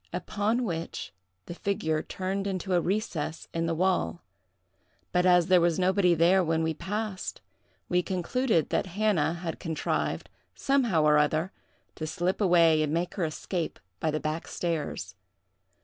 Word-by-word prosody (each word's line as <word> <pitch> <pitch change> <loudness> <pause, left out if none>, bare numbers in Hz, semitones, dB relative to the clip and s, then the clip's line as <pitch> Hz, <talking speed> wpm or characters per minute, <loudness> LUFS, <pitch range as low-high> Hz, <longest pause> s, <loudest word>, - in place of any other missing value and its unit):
Upon 210 +6 0
which 165 - -4 0.3
the - - -6
figure 160 -5 -1
turned 195 +1 -3
into 190 -1 -2
a 175 - +4
recess 170 -5 -2
in 165 -1 -1
the 165 - 0
wall; 160 - 0 0.9
but, 180 +1 +3
as 180 -1 +5
there 180 -1 +5
was 170 -1 +2
nobody 185 -1 +3
there 175 +4 +4
when 165 -1 +1
we 160 0 0
passed, 205 +3 -4 0.5
we 180 0 +2
concluded 185 - 0
that - - 0
Hannah 200 -8 +2
had 170 -1 -5
contrived, 160 -3 -2 0.3
somehow 240 - +2
or 150 0 +5
other, 155 +5 +1 0.4
to 155 - -5
slip 175 +5 -1
away 170 -4 +5
and 150 -1 0
make 170 +2 -1
her 185 - -1
escape 165 +2 -3 0.2
by 160 - 0
the 155 0 -1
back 155 +2 -3
stairs. 160 - -3
175 Hz, 150 wpm, -28 LUFS, 160-190 Hz, 0.9 s, as